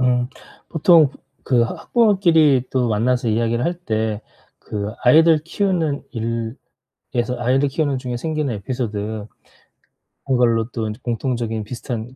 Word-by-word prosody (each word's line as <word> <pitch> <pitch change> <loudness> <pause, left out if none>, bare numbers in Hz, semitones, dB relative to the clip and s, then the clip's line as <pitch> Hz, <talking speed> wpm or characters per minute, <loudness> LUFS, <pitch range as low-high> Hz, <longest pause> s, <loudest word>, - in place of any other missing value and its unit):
음 125 -1 +2 0.4
보통 160 -1 +5 0.4
그 120 -3 +3
하 - - -4
학부모끼리 170 - +3
또 125 -2 +1
만나서 120 +3 +1
이야기를 115 +2 0
할 175 - 0
때 110 -9 -2 0.4
그 105 0 -4
아이들 160 +5 +6
키우는 170 -4 -1
일에서 115 0 -5 0.6
아이를 130 +4 +2
키우는 145 -1 0
중에 125 -2 -4
생기는 155 -2 -2
에피소드 110 0 -3 1.3
그런 130 -2 +1
걸로 115 -2 +2
또 115 -3 -3
공통적인 115 -2 -2
비슷한 120 +1 -6
125 Hz, 280 characters per minute, -20 LUFS, 115-150 Hz, 1.3 s, 아이들